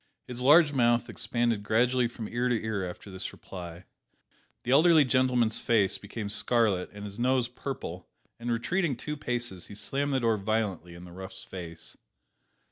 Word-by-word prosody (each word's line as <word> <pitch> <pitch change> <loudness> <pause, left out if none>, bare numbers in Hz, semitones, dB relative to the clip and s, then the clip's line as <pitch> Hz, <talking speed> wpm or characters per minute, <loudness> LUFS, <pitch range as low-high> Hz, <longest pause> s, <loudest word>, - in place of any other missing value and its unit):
His 125 0 -4
large 145 +3 +6
mouth 120 -3 +2
expanded 120 -3 0
gradually 120 +4 +2
from 115 -2 -7
ear 120 +1 -1
to 120 -2 +1
ear 105 -5 -3
after 95 +3 -10
this 95 - -4
reply. 90 -1 -9 0.8
The 125 - -2
elderly 155 +1 +6
gentleman's 125 -3 +2
face 105 -5 +2
became 105 +1 -6
scarlet 105 -3 +3
and 105 0 -9
his 100 +2 -8
nose 125 0 +2
purple, 120 -8 -6 0.3
and 120 +1 -3
retreating 150 +4 0
two 150 +5 -5
paces, 120 - -3
he 100 - -10
slammed 140 +6 -1
the - - +2
door 115 -3 +2
violently 100 -5 -2
in 85 - -11
the 90 - -12
rough's 95 +1 -9
face. 85 -3 -8
115 Hz, 165 wpm, -28 LUFS, 100-125 Hz, 0.8 s, large